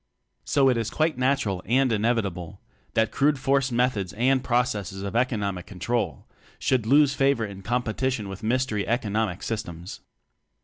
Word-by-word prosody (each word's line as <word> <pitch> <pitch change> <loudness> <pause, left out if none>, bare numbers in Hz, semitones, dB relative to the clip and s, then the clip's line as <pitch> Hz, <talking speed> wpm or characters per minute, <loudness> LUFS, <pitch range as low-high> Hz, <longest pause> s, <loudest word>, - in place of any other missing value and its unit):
So 140 -1 +3
i. 130 - +5
is 115 -2 -2
quite 155 -1 0
natural 130 -8 +1
and 130 +1 +2
inevitable 100 -6 -1 0.4
that 110 0 +2
crude 145 +1 +2
force 135 0 +1
methods 120 -6 0
and 130 +3 +2
pro 120 0 +3
cesses 100 -5 -5
of 100 +2 -5
economic 105 -7 -1
control 105 +5 -2 0.3
should 125 -4 0
lose 140 +2 +5
favor 135 -5 +2
in 100 -2 -9
competition 120 +1 -1
with 95 +1 -7
mystery 115 -2 0
economic 110 -4 -1
systems. 90 -6 -5
115 Hz, 145 wpm, -25 LUFS, 100-130 Hz, 0.4 s, i